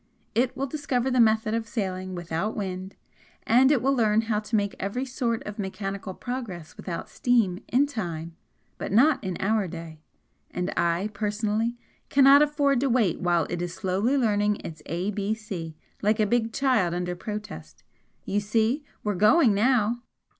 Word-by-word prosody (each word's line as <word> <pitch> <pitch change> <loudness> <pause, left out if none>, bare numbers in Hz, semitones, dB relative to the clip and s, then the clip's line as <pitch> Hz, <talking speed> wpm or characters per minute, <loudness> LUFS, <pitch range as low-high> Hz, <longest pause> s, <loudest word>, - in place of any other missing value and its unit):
It 245 +3 +1
will 275 - 0
discover 265 -3 -1
the 255 - +2
method 220 -1 +3
of 225 0 -1
sailing 185 -5 -3
without 175 +5 -3
wind, 190 -1 -4 0.5
and 260 +4 +5
it 270 -6 +2
will 275 +1 +3
learn 220 -4 +3
how 220 -2 0
to 215 +1 -3
make 200 -1 +1
every 225 +7 -2
sort 245 -3 -2
of 210 +1 -7
mechanical 195 -1 -4
progress 230 -11 -6
without 170 -3 -5
steam 225 -8 +1
in 265 +4 +3
time 170 - -5 0.4
but - - -4
not 260 +6 +4
in 185 -3 -3
our 210 0 +1
day, 165 -2 -9 0.5
and 180 +1 -3
I, 170 +5 0
personally, 215 +2 -1 0.3
cannot 275 +1 +7
afford 285 -3 +2
to 275 +1 +1
wait 230 -9 +2
while 175 -2 +2
it 175 -1 -2
is 175 0 -4
slowly 195 +10 0
learning 210 -4 +2
its 155 -2 -8
ABC 195 -1 -3 0.3
like 215 +2 +2
a 215 - +4
big 230 +1 +1
child 230 -12 +1
under 180 0 -2
protest. 80 - -7 0.4
You 205 - 0
see 225 +7 +1 0.2
we're 210 - 0
going 215 - +5
now!" 235 +1 +2
210 Hz, 160 wpm, -26 LUFS, 185-240 Hz, 0.5 s, cannot